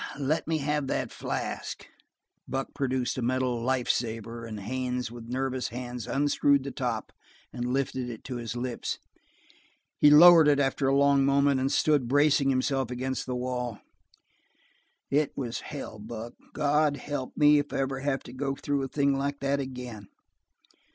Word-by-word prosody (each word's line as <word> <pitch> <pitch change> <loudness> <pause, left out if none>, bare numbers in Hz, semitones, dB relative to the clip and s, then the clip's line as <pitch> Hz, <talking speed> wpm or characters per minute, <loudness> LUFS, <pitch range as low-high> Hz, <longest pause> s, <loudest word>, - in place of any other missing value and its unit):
"Let 145 +3 -1
me 160 0 +1
have 150 -1 -1
that - - -2
flask." - - -4 0.6
Buck 135 +1 -3
produced 130 -2 -1
a - - -2
metal 125 -1 0
"life 130 0 0
saver," 115 0 -2
and 110 -2 -6
Haines 125 +2 -3
with 120 -1 -10
nervous 130 0 -1
hands 125 0 -6
unscrewed 140 0 +2
the 140 - -5
top 120 -5 -3 0.4
and 125 0 -3
lifted 130 -1 -1
it 115 -2 -8
to 125 -2 -5
his 115 0 -5
lips. 120 0 -3 1.0
He 150 - +7
lowered 165 +1 +9
it 145 -1 +4
after 135 0 +1
a 135 +1 +3
long 140 -1 +4
moment 140 0 +3
and 135 +1 0
stood 145 -5 +2
bracing 145 +1 +3
himself 135 -1 0
against 130 +2 -3
the 125 - -2
wall. 125 -2 -3 1.3
"It 145 +1 +2
was 120 -3 -3
hell, 135 -7 -7
Buck. 115 +2 -7 0.2
God 150 0 +2
help 145 -3 -5
me 150 -1 +6
if 145 - -4
I - - -2
ever 135 0 -2
have 135 0 -1
to 120 - -11
go 135 +1 -2
through 140 0 -1
a 135 - -2
thing 140 0 +1
like 140 +1 -2
that 140 +1 +1
again." 125 -6 -6
130 Hz, 165 wpm, -28 LUFS, 125-140 Hz, 1.3 s, lowered